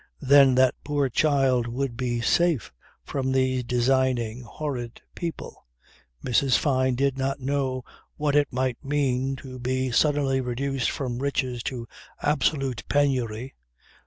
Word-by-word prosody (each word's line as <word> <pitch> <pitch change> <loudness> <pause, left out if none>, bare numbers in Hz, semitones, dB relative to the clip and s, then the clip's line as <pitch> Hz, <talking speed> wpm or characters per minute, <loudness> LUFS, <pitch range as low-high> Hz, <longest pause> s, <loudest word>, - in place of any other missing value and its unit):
Then 135 -1 +6
that 130 0 +4
poor 145 -2 0
child 135 -3 +2
would 125 +1 -3
be 120 -1 -2
safe 165 - +1 0.3
from 130 - -2
these 130 -1 +1
designing, 125 -1 +1
horrid 125 -2 -5
people. 170 - -7 0.6
Mrs. 125 +1 +3
Fyne 130 -3 +1
did 135 +1 0
not 135 +1 -1
know 130 -1 -1 0.3
what 150 -1 0
it 145 -1 +4
might 130 -1 -2
mean 135 -2 0
to 130 -1 -9
be 130 +1 -1
suddenly 140 0 +2
reduced 130 +1 -1
from 125 -3 -3
riches 130 -3 -1
to 120 -3 -7 0.4
absolute 135 -3 0
penury. 130 -4 0
130 Hz, 130 wpm, -25 LUFS, 125-140 Hz, 0.6 s, Then